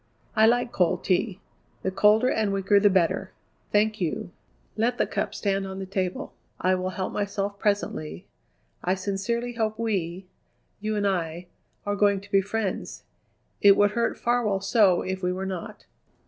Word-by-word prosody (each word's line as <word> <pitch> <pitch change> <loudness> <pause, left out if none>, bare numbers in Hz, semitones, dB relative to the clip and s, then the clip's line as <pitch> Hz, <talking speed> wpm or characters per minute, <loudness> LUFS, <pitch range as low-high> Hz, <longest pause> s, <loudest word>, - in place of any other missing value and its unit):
"I 220 0 +6
like 240 +1 +2
cold 180 -2 +1
tea; 190 +1 0 0.4
the 190 - 0
colder 210 +6 +4
and 215 -2 +1
weaker 195 +1 +3
the 205 0 +5
better. 185 0 +1 0.4
Thank 215 0 +2
you. 175 +1 -2 0.4
Let 230 +3 +1
the - - +2
cup - - -3
stand 195 -1 -1
on 190 0 -6
the 190 - -4
table; 185 -1 -3 0.3
I 185 - +2
will 185 0 -1
help 185 0 -4
myself 200 0 -2
presently. 85 - -2 0.6
I 185 +1 +1
sincerely 210 +6 -2
hope 220 -2 -1
we, 190 -5 -2 0.5
you 215 +1 -2
and 205 -1 0
I, 175 -3 -1 0.4
are 205 0 0
going 200 -1 +3
to 200 +1 -16
be 195 - +5
friends. 205 0 -3 0.6
It 200 -1 +7
would 205 0 +4
hurt 235 +2 0
Farwell 235 -5 +1
so 195 -3 +3
if 190 0 -3
we 180 -1 0
were 190 +1 -3
not." 185 -3 -6
195 Hz, 165 wpm, -26 LUFS, 185-215 Hz, 0.6 s, It